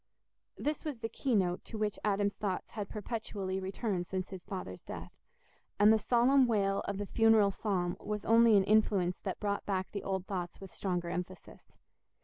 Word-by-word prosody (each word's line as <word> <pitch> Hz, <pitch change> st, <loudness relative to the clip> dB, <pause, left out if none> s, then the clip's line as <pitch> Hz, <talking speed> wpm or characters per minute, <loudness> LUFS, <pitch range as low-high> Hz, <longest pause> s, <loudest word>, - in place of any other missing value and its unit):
This 300 Hz, 0 st, -2 dB
was 300 Hz, -5 st, -4 dB
the 225 Hz, 0 st, -4 dB
key 250 Hz, +2 st, -1 dB
note 180 Hz, -3 st, +1 dB
to 225 Hz, -, -7 dB
which 210 Hz, -1 st, -1 dB
Adam's 205 Hz, -1 st, +1 dB
thoughts 195 Hz, -3 st, -3 dB
had 205 Hz, -3 st, -5 dB
perpetually 205 Hz, -3 st, -4 dB
returned 190 Hz, -1 st, -2 dB
since 185 Hz, -1 st, -3 dB
his 185 Hz, -2 st, -7 dB
father's 180 Hz, -, -6 dB
death, -, -, -8 dB, 0.7 s
and 210 Hz, +2 st, +7 dB
the 220 Hz, -, +3 dB
solemn 250 Hz, +4 st, +4 dB
wail 200 Hz, -3 st, +1 dB
of 200 Hz, -, -2 dB
the 205 Hz, -, -3 dB
funeral 225 Hz, -1 st, +4 dB
psalm 185 Hz, -3 st, -1 dB
was 210 Hz, -1 st, -4 dB
only 230 Hz, -1 st, +6 dB
an 195 Hz, -, +4 dB
influence 195 Hz, -3 st, +2 dB
that 190 Hz, -, -4 dB
brought 200 Hz, -1 st, -1 dB
back 190 Hz, -2 st, -1 dB
the 200 Hz, -, -4 dB
old 190 Hz, -1 st, -2 dB
thoughts 180 Hz, -3 st, -4 dB
with 195 Hz, -2 st, -11 dB
stronger 175 Hz, -3 st, -2 dB
emphasis. 180 Hz, 0 st, -7 dB
200 Hz, 180 wpm, -32 LUFS, 185-220 Hz, 0.7 s, and